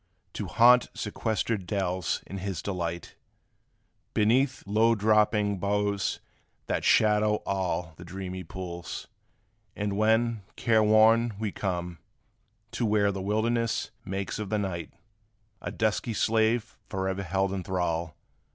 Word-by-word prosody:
To 105 - -4
haunt 120 +7 +6
sequestered 105 -2 -2
dells 95 -3 -1
is 100 +2 -6
his 95 -4 -3
delight 85 -3 -4 1.0
Beneath 125 +5 +2
low 110 +3 +3
drooping 105 -1 +2
boughs 100 0 0 0.5
that - - -1
shadow 105 0 +3
all 90 -3 -2
The 85 - -10
dreamy 95 +1 -6
pools; 85 0 -7 0.7
and 105 -1 -2
when, 110 +1 +2
care 110 -2 +3
worn, 110 +1 +5
we 105 -1 -2
come 90 -4 -3 0.7
To - - -3
where 105 -1 +3
the 95 -1 -5
wilderness 110 +3 0
makes 95 +2 -4
of 105 -2 -4
the 105 - +1
night 90 -6 -3 0.7
A - - -4
dusky 110 +1 -1
slave 110 +1 +1
forever 95 0 -2
held 95 +1 0
in 95 -2 -3
thrall. 85 -3 -2
100 Hz, 125 wpm, -28 LUFS, 95-110 Hz, 1.0 s, haunt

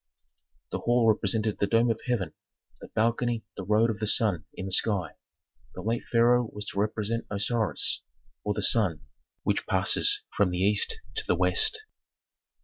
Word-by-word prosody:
The - - -2
hall 120 -1 +2
represented 110 0 +1
the 100 - +1
dome 115 +3 +3
of 115 - -4
heaven, 105 -10 -1 0.5
the - - -10
balcony 115 +1 0
the 95 - -6
road 110 +4 +3
of 105 - -7
the 110 - -2
sun 100 -6 +2
in 95 - -6
the 95 - -5
sky. 95 -4 +1 0.6
The 90 - -7
late 115 +3 -2
pharaoh 120 0 +3
was 105 0 -6
to 100 - -4
represent 110 +2 -2
Osiris, 105 +2 0 0.4
or 105 -1 -1
the - - -1
sun, 95 -10 +3 0.4
which - - -1
passes 410 - +3
from 100 -3 +3
the 90 - -3
east 100 +3 +1 0.2
to - - 0
the - - +2
west. 90 - +2
110 Hz, 165 wpm, -27 LUFS, 100-115 Hz, 0.6 s, dome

